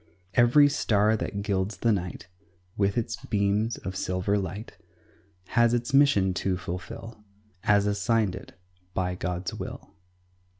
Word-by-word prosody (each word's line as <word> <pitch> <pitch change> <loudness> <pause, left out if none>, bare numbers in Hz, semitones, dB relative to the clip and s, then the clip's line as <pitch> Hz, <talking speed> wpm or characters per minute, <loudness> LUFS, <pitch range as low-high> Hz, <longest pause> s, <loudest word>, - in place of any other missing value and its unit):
Every 120 +6 +6
star 110 -5 +2
that 100 -1 -4
gilds 100 0 -1
the 115 - +2
night 90 -5 -3 0.5
With 100 +1 +1
its 115 - -1
beams 105 +2 0
of 95 - -6
silver 95 +2 0
light 100 +2 -4 0.7
Has 120 -1 +3
its 120 +2 -3
mission 135 -10 +4
to 95 -2 0
fulfil, 100 +5 -7 0.4
As 100 -1 +4
assigned 105 0 +1
it 90 - -11 0.4
by 90 -1 0
God's 90 0 -3
will. - - -8
100 Hz, 130 wpm, -27 LUFS, 95-115 Hz, 0.7 s, Every